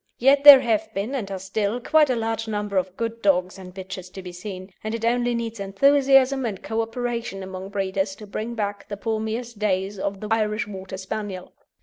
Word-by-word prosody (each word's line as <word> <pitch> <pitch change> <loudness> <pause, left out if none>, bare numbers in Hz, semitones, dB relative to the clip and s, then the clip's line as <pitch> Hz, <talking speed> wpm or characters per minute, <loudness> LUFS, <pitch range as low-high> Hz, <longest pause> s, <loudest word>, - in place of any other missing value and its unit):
Yet 275 +3 +4
there 285 -2 +12
have 230 -4 0
been, 205 +7 -2
and 230 -8 -3
are 195 - -4
still, 200 +4 -2
quite 300 +3 +3
a 255 - +2
large 225 0 -2
number 205 -2 -2
of 185 0 -1
good 230 0 -3
dogs 185 -1 +1
and 185 -1 -10
bitches 185 -1 -8
to 190 - -8
be 180 - -7
seen, 185 +1 -8
and 220 +1 -2
it 230 0 -3
only 240 0 +1
needs 230 -1 -4
enthusiasm 270 +6 +4
and 210 -6 -4
co 225 0 -1
operation 230 -3 -4
among 190 0 -7
breeders 195 -1 -2
to 210 - -11
bring 220 +3 -5
back 205 -2 -3
the 205 - -5
palmiest 220 +1 -3
days 195 -1 -1
of 195 0 -3
the 215 - -6
Irish 215 -1 +1
Water 190 -2 -7
Spaniel. 190 -1 -6
210 Hz, 205 wpm, -24 LUFS, 190-235 Hz, -, there